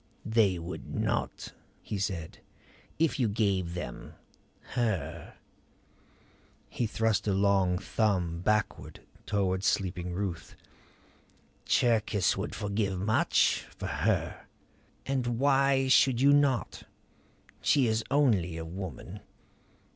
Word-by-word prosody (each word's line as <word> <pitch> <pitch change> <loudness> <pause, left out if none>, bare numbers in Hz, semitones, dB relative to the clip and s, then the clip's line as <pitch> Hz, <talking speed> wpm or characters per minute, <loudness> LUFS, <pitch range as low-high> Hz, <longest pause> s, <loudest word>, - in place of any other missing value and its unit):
"They 110 -5 +3
would 85 +2 -7
not," - - -2 0.3
he 105 - -5
said 90 -5 -4 0.6
"If 160 -2 +1
you 120 - +3
gave 95 -5 0
them 65 -9 -7 0.6
her." 85 - -2 1.3
He 120 - -2
thrust 110 -2 0
a 100 - +2
long 95 -2 +2
thumb 90 -5 0
backward 105 +2 -1 0.3
toward 95 -2 0
sleeping 90 -2 -1
Ruth. 90 -2 -4 1.1
"Cherkis 110 -4 +2
would - - -4
forgive 100 -2 -2
much 105 +3 +2
for - - -5
her. - - -1 0.6
And 125 -3 -1
why 135 0 +3
should 130 -2 +4
you 140 +2 +5
not? 140 -4 +1 0.8
She 140 -3 +3
is 110 -1 0
only 105 - +2
a 80 - -5
woman." 90 -3 -7
100 Hz, 105 wpm, -29 LUFS, 90-120 Hz, 1.3 s, you